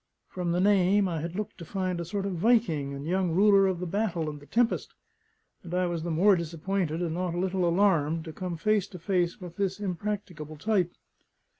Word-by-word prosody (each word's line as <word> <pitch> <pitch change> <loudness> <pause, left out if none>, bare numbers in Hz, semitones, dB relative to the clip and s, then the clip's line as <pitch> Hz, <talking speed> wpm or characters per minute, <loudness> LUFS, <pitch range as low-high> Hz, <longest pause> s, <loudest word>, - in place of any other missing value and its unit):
From 180 -2 -2
the 175 - +1
name, 195 0 +4
I 165 -4 -2
had 170 +2 -5
looked 210 -1 -5
to - - -7
find 185 -1 -2
a - - -4
sort 195 +3 -3
of 200 - -2
Viking 175 - +2
and 140 +1 -6
young 185 +2 +1
ruler 195 +1 +5
of 185 -2 -1
the 180 - -3
battle 175 -4 -1
and 150 - -9
the 145 - -16
tempest; 235 0 0 0.7
and 175 0 -6
I 180 0 +2
was 170 -2 -2
the 170 - -4
more 185 +5 +5
disappointed, 170 0 -2
and 165 -2 -2
not 175 0 -2
a - - -1
little 185 -1 +1
alarmed, 165 -4 +2
to 160 - -7
come 180 -1 -4
face 210 +2 +1
to 185 - -10
face 175 0 0
with 175 -3 -9
this 195 -1 -1
impracticable 180 -5 -4
type. 185 0 +1
180 Hz, 210 wpm, -28 LUFS, 165-195 Hz, 0.7 s, ruler